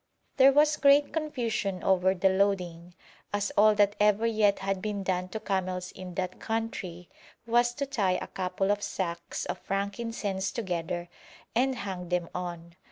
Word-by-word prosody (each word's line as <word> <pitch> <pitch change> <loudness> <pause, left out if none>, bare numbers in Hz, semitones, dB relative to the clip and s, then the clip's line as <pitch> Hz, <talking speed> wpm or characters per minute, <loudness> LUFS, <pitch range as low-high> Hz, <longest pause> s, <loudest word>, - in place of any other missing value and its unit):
There 270 0 +8
was 300 +2 +4
great 285 0 +5
confusion 235 - -2
over 190 0 +3
the 190 +1 +3
loading, 180 -3 0 0.4
as 205 0 -1
all 215 +1 +6
that 205 0 +3
ever 210 +1 +3
yet 215 -3 +3
had 195 -1 -2
been 205 -1 -3
done 185 -1 -1
to 220 - -4
camels 185 -3 -2
in 185 -2 -9
that 185 -1 -3
country 200 -6 -4 0.4
was 240 +1 +2
to 280 - -2
tie 200 -9 +1
a - - -5
couple 190 +1 -1
of 205 0 0
sacks 170 -4 -3
of - - -4
frankincense 200 -1 -2
together 175 -5 -3 0.5
and 260 +2 +2
hang 185 -5 -5
them 180 -2 -1
on. 170 -1 -6
195 Hz, 160 wpm, -28 LUFS, 180-225 Hz, 0.5 s, There